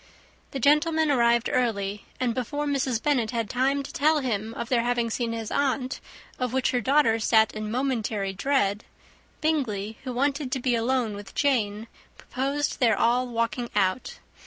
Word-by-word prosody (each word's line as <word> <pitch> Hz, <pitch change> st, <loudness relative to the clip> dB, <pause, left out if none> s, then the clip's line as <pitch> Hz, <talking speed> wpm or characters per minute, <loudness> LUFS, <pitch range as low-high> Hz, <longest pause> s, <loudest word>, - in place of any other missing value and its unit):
The 270 Hz, -, -5 dB
gentlemen 305 Hz, +3 st, +3 dB
arrived 235 Hz, -2 st, +3 dB
early; 210 Hz, -5 st, -1 dB
and, 245 Hz, -2 st, 0 dB
before 275 Hz, +5 st, -3 dB
Mrs. 270 Hz, -5 st, 0 dB
Bennet 255 Hz, -7 st, +1 dB
had 230 Hz, -2 st, -2 dB
time 270 Hz, +3 st, +1 dB
to -, -, -9 dB
tell 310 Hz, +2 st, +3 dB
him 225 Hz, -5 st, -2 dB
of -, -, -4 dB
their 240 Hz, -2 st, +2 dB
having 240 Hz, -1 st, 0 dB
seen 235 Hz, 0 st, -1 dB
his 225 Hz, -1 st, -5 dB
aunt, 270 Hz, -2 st, 0 dB, 0.4 s
of 250 Hz, -1 st, -2 dB
which 265 Hz, -1 st, +1 dB
her 245 Hz, -, 0 dB
daughter 260 Hz, -2 st, +3 dB
sat 220 Hz, 0 st, +3 dB
in 215 Hz, 0 st, -5 dB
momentary 220 Hz, -5 st, -1 dB
dread, 205 Hz, -2 st, 0 dB, 0.6 s
Bingley, 225 Hz, -10 st, -1 dB
who 260 Hz, -, -4 dB
wanted 275 Hz, +2 st, -1 dB
to 265 Hz, -, -1 dB
be 250 Hz, 0 st, 0 dB
alone 235 Hz, -1 st, 0 dB
with 200 Hz, -1 st, -10 dB
Jane, 220 Hz, -7 st, +1 dB, 0.3 s
proposed 275 Hz, +3 st, -2 dB
their 230 Hz, -5 st, +3 dB
all 245 Hz, +2 st, +2 dB
walking 230 Hz, 0 st, -2 dB
out. 195 Hz, +4 st, 0 dB
245 Hz, 165 wpm, -26 LUFS, 220-275 Hz, 0.6 s, gentlemen